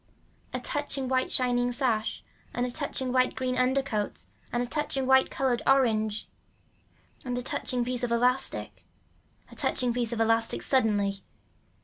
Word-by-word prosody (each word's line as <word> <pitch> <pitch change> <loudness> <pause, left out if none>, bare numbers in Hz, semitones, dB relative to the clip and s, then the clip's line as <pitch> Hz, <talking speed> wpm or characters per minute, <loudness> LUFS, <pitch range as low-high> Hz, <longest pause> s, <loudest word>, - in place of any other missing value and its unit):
A - - -2
touching 290 -3 -2
white 260 0 0
shining 245 -1 +1
sash 240 -4 -1 0.3
and 245 - 0
a 250 - -3
touching 265 -2 -2
white 255 0 +2
green 255 -1 -1
undercoat 255 -4 0 0.3
and 240 0 0
a - - -2
touching 275 0 -1
white 265 0 +5
colored 260 -3 0
orange 220 -5 +2 1.0
and 245 -1 -3
a 250 - -3
touching 245 -1 -1
piece 250 0 -2
of 245 -1 -1
elastic. 250 +2 +1 0.7
A - - -11
touching 245 -2 0
piece 240 -1 -1
of 235 - -3
elastic 225 0 +2
suddenly. 205 -6 +1
250 Hz, 145 wpm, -28 LUFS, 235-260 Hz, 1.0 s, white